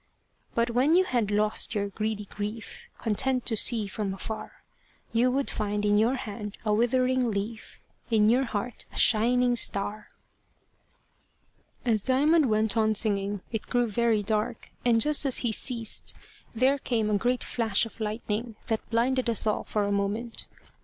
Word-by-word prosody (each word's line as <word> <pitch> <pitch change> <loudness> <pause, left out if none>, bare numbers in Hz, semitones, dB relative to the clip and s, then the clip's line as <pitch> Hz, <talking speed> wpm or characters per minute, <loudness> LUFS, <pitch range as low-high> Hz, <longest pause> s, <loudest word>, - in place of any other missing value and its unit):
But 235 +1 +1
when 265 +7 +3
you 370 - +5
had 240 - 0
lost 210 +2 +1
your 200 -1 -1
greedy 210 +1 -3
grief, 210 +2 -7
Content 250 +3 0
to 225 - +1
see 220 0 +3
from 195 0 -3
afar, 215 +4 -7 0.5
You 235 +2 +3
would 270 +2 -1
find 210 -1 -2
in 205 0 +3
your 235 +5 +2
hand 210 -4 -6
a 210 - +2
withering 255 +2 +2
leaf, 215 +2 -5 0.3
In 215 -2 +4
your 250 +4 +3
heart 235 +1 -4
a - - -11
shining 245 +2 +4
star. 205 -1 0 1.8
As 220 -4 +2
Diamond 285 +4 +3
went 215 0 +2
on 220 -1 +2
singing, 200 -2 0
it 225 -2 -4
grew 245 -1 +1
very 225 -1 +1
dark, 220 +3 -2
and 235 -2 +4
just 300 +5 +2
as 270 -3 +1
he 235 - +2
ceased 230 0 -1 0.4
there 265 +4 +3
came 225 -5 -1
a 205 - +3
great 245 +3 0
flash 225 -3 +1
of 225 - -12
lightning, 220 +1 -3
that 220 -1 -2
blinded 245 +2 +1
us 230 - +1
all 215 - 0
for 210 - -1
a 200 - -1
moment. 205 +4 -2
225 Hz, 160 wpm, -27 LUFS, 210-245 Hz, 1.8 s, you